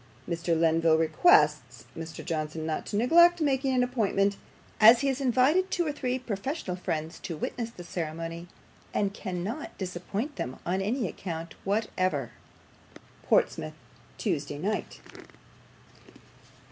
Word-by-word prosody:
"Mr. 170 -1 0
Lenville 165 -1 +4
requests 150 -5 +3
Mr. 165 0 -7
Johnson 155 -2 -3
not 160 -1 -3
to - - -4
neglect 340 +9 +6
making 270 -3 +1
an 250 - +3
appointment, 205 -5 +1 0.4
as 230 +3 +8
he 280 - +1
has 265 +1 -2
invited 275 +9 +3
two 350 -2 0
or 300 - 0
three 255 -3 -2
professional 240 - -4
friends 160 -2 -4
to 165 - -6
witness 230 +8 -3
the 185 -6 -11
ceremony, 165 0 -5 0.5
and 200 -1 +1
cannot 200 - -5
disappoint 195 - -4
them 125 - -3
upon 185 +2 -2
any 220 +3 -1
account 165 -1 -6
whatever. 185 - -1 1.0
"PORTSMOUTH, 75 - +1 0.4
TUESDAY 145 - -2
NIGHT." 205 +8 -3
190 Hz, 125 wpm, -28 LUFS, 165-250 Hz, 1.0 s, as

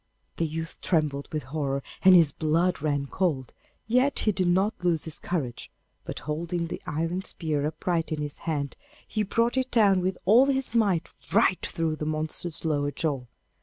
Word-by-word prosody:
The 165 - +1
youth 160 +2 -5
trembled 150 -5 0
with 155 -3 -2
horror, 140 0 -2 0.2
and 190 -1 +8
his 165 -5 +6
blood 165 +3 +1
ran 145 -2 0
cold, 140 -5 -1 0.3
yet 250 +5 +2
he 215 - +3
did 185 -2 0
not 190 +5 +3
lose 170 -3 +2
his 160 - -6
courage; 140 -9 -3 0.4
but, - - -6
holding 170 +3 -2
the 165 - -6
iron 165 +4 -1
spear 150 -5 0
upright 165 +2 -2
in 155 - -1
his 145 -1 -4
hand, 145 -3 -2 0.3
he 215 - -1
brought 230 +5 +1
it 260 0 +1
down 200 -5 +4
with 185 +1 -1
all 235 +8 +6
his 265 -3 +2
might 200 -8 +1 0.2
right 200 -3 +3
through 165 -2 -1
the 150 - -3
monster's 155 +1 -3
lower 145 -2 +1
jaw. 145 -4 -2
165 Hz, 175 wpm, -27 LUFS, 150-190 Hz, 0.4 s, and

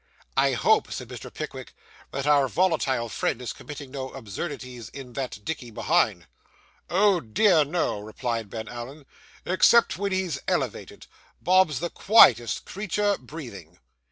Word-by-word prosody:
'I - - +3
hope,' - - +2
said - - -6
Mr. - - -9
Pickwick, - - -7 0.3
'that 135 0 -4
our 145 -2 +4
volatile 140 -8 +1
friend 115 - -2
is 125 - -5
committing 145 -3 -9
no 130 -1 -5
absurdities 120 0 -7
in 135 -3 -10
that 130 -6 -4
dickey 145 -7 -4
behind.' 110 - +1 0.6
'Oh 195 0 +4
dear, 165 - +3
no,' 150 -7 -1
replied 110 +1 -4
Ben 110 0 -6
Allen. 125 +5 -8 0.4
'Except 185 +3 +4
when 200 0 -1
he's 185 -6 -1
elevated, - - -3 0.3
Bob's 180 -5 +3
the 175 - -3
quietest 120 - +5
creature 205 +1 -1
breathing. 100 - -10
140 Hz, 135 wpm, -25 LUFS, 120-180 Hz, 0.6 s, quietest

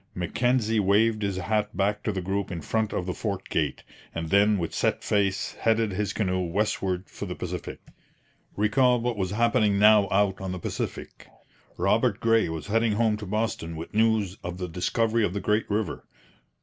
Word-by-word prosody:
Mackenzie 115 +5 +1
waved 105 +3 +3
his 100 -2 -1
hat 105 +1 -1
back 100 +1 +1
to 105 - -1
the 95 -3 -4
group 100 +2 -2
in 85 -2 -4
front 110 +6 -1
of 90 - -2
the 90 - -2
fort 100 -2 -4
gate; 75 -3 -1 0.3
and 80 -1 -4
then 105 +1 +4
with 85 -3 -3
set - - 0
face 100 -2 0
headed 115 -1 +1
his 100 +1 -1
canoe 95 -4 -1
westward 95 0 -1
for - - -7
the - - -5
Pacific. - - -6 0.8
Recall 125 +4 +3
what 120 0 -1
was 95 -3 -2
happening 110 -1 +2
now 105 0 +6
out 95 -1 +1
on 95 -1 -3
the - - -4
Pacific! 85 - -5 0.5
Robert - - +2
Gray 115 -5 +3
was 80 -1 -5
heading 115 +1 +1
home 110 0 +2
to 105 -1 -8
Boston 105 -5 -2
with 80 +1 -8
news 110 -3 +1
of 90 0 -5
the 90 -1 -4
discovery 110 +7 0
of 90 - 0
the - - 0
great 105 +2 0
river. 105 0 -2
105 Hz, 185 wpm, -26 LUFS, 95-110 Hz, 0.8 s, now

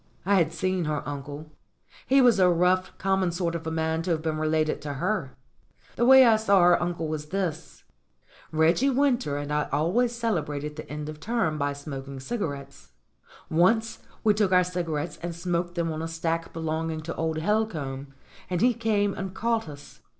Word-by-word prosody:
I 200 +1 +4
had 165 -3 +2
seen 185 +1 -1
her 150 -1 -2
uncle. 145 +2 -7 0.6
He 270 +1 +5
was 240 -5 +5
a 180 -1 +6
rough, 180 +2 +1
common 190 -2 +1
sort 170 -1 -2
of 165 -1 -5
a - - 0
man 160 0 -1
to 165 - -4
have 160 -2 0
been 155 -1 -1
related 155 0 0
to 145 -1 -4
her. 140 -2 -2 0.6
The 240 - +2
way 265 0 +9
I 225 -2 +5
saw 200 -4 +4
her 175 0 +5
uncle 175 -2 -2
was 155 -1 -4
this: 170 -2 -4 0.7
Reggie 165 - +3
Winter 255 - +1
and 145 0 -4
I 150 0 0
always 180 - +1
cele 230 -2 0
brated 150 0 -5
the 155 - -9
end 150 0 -5
of 155 0 -7
term 200 -8 -1
by 145 0 0
smoking 140 -1 -7
cigarettes. 140 - -5 0.5
Once 220 +7 +2 0.2
we 215 - +5
took 205 -2 +1
our 180 0 +5
cigarettes 170 -3 -3
and 170 -1 -4
smoked 175 0 -2
them 170 -2 -1
on 155 0 -4
a 165 - -3
stack 165 0 -2
belonging 160 0 -3
to 165 +2 -6
old 160 -1 -1
Helcomb, 155 -8 -1 0.4
and 180 -1 -1
he 245 +1 +4
came 205 -3 0
and 190 -1 -6
caught 230 -4 -1
us. 145 -1 -12
165 Hz, 185 wpm, -26 LUFS, 155-195 Hz, 0.7 s, way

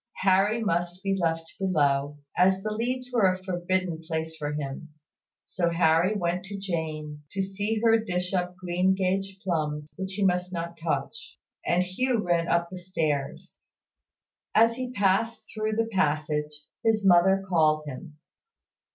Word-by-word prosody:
Harry 200 +4 +3
must 175 -1 -1
be 195 0 +1
left 165 -3 0
below, 145 -6 +1 0.2
as 190 +1 +3
the 215 - -2
leads 250 +3 -2
were 205 -6 +4
a 185 0 -6
forbidden 180 -2 -1
place 160 -1 -3
for 150 -2 -3
him. 150 +1 -5 0.6
So 175 -2 0
Harry 170 +3 +3
went 180 -1 -1
to 200 +1 -6
Jane, 155 -5 -4
to 195 - 0
see 205 +3 -2
her 225 -1 +5
dish 180 -2 -2
up 180 -1 -1
greengage 190 +2 0
plums 150 -4 -2
which 190 0 -4
he 200 0 0
must 180 0 +1
not 170 -1 -4
touch: 165 -2 -4 0.3
and 175 +1 +2
Hugh 240 +8 0
ran 175 -5 +1
up 170 0 +1
the 185 - -6
stairs. 155 -6 -3 1.0
As 230 +1 +5
he 255 0 -4
passed 205 +1 +1
through 215 0 -1
the 225 +1 +2
passage, 150 -4 0 0.2
his 220 -2 +2
mother 190 +1 +5
called 155 -4 +3
him. 150 +3 -8
180 Hz, 150 wpm, -27 LUFS, 160-195 Hz, 1.0 s, her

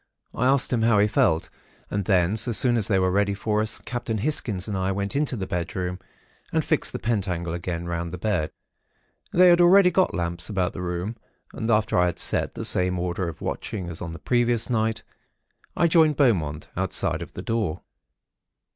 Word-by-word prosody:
I 125 - +1
asked 135 -1 +2
him 120 - +1
how 115 -1 +4
he 100 - +5
felt; 80 -6 +1 0.4
and 100 -2 -1
then, 95 0 +2
so 120 +2 +1
soon 120 +3 +4
as 110 -4 +1
they 100 - +2
were 95 -1 +2
ready 100 +1 +1
for 105 +1 0
us, 110 0 -1
Captain 120 -2 -3
Hisgins 105 -6 -1
and 105 - -3
I 95 0 0
went 100 +3 -3
into 145 -2 0
the 95 - -3
bedroom 90 +1 -3 0.5
and - - 0
fixed - - 0
the - - -4
pentacle 90 -7 -2
again 85 0 -4
round 85 0 -3
the 90 - -5
bed. 90 -5 -1 0.8
They 180 0 +6
had 175 0 +5
already 180 +1 +6
got 185 0 +2
lamps 85 +2 -3
about 95 -3 -1
the 90 - -6
room; 90 +5 -4 0.4
and 110 - -4
after 110 -4 +2
I 90 - +4
had 85 - -3
set - - 0
the - - -4
same 90 0 +2
order 90 +1 -2
of - - -10
watching, 90 -5 -4
as 85 - -6
on 85 - -5
the 85 - -7
previous 120 +2 0
night, 110 -1 0 0.7
I 170 - +4
joined 160 -2 +4
Beaumont, 85 - +1
outside 95 -2 -1
of 85 - -8
the 90 - -7
door. 110 -8 -2
100 Hz, 200 wpm, -24 LUFS, 90-115 Hz, 0.8 s, They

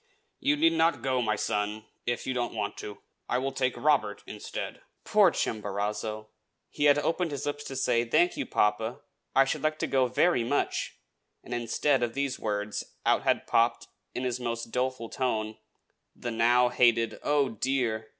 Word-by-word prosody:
"You 290 +1 +2
need 330 +2 +4
not 170 - +2
go, 130 -1 +1
my 110 -2 +1
son, 105 +1 -2 0.2
if 120 0 -1
you 130 - -1
do 125 - -1
not 120 - -2
want 105 -2 -3
to. 105 -1 -7 0.3
I 125 - +2
will 135 +2 -1
take 130 -2 -1
Robert 135 -9 +1
instead." - - -6 0.2
Poor - - +5
Chimborazo! 105 +1 -3 0.4
He 145 - 0
had 145 0 +6
opened 165 +3 0
his 145 -3 -4
lips 145 0 -3
to 135 - -6
say, 120 -2 +2
"Thank 345 - +2
you, 285 - -3
papa. 110 +3 0 0.3
I 135 - +6
should - - -2
like 155 0 0
to - - -1
go 130 -2 +2
very 125 +1 +2
much!" 140 +5 -1 0.5
and, 120 - -7
instead 120 +3 +1
of 120 -1 -1
these 140 -1 -1
words, 105 -1 -2 0.2
out - - +3
had - - +1
popped, - - +1 0.3
in 125 - -2
his 125 -1 -1
most 115 -1 -4
doleful 125 -2 -2
tone, 110 -4 -2 0.6
the 120 - -5
now 120 +2 +4
hated 120 -2 +3
"Oh, 145 -2 +2
dear!" 115 -2 -1
125 Hz, 180 wpm, -28 LUFS, 110-135 Hz, 0.6 s, had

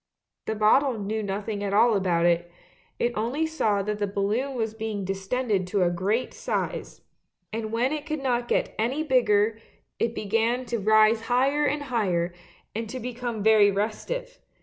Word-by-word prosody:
The 220 - -1
bottle 230 +4 +3
knew 215 +2 -2
nothing 205 +1 -3
at 200 0 -1
all 230 +1 +5
about 175 -3 +1
it; 175 0 +2 0.5
it 240 0 0
only 245 +9 0
saw 215 -11 0
that 210 +1 -3
the 205 - 0
balloon 210 +8 -1
was 220 -2 -2
being 220 -3 -4
distended 195 +1 -1
to 190 0 +1
a 175 - +2
great 200 +8 -1
size, - - -3 0.5
and 220 -1 -3
when 240 +4 +1
it 305 0 -4
could 310 -3 -3
not 245 -2 0
get - - 0
any 260 +8 0
bigger 225 -6 +2 0.4
it 230 0 0
began 230 +4 0
to 235 -1 -2
rise 215 +2 +4
higher 275 +4 +2
and 290 +1 -1
higher, 185 -10 0 0.4
and 225 0 -4
to 255 - -5
become 240 -3 -4
very 215 -2 +6
restive. 485 - -3
220 Hz, 170 wpm, -26 LUFS, 205-250 Hz, 0.5 s, very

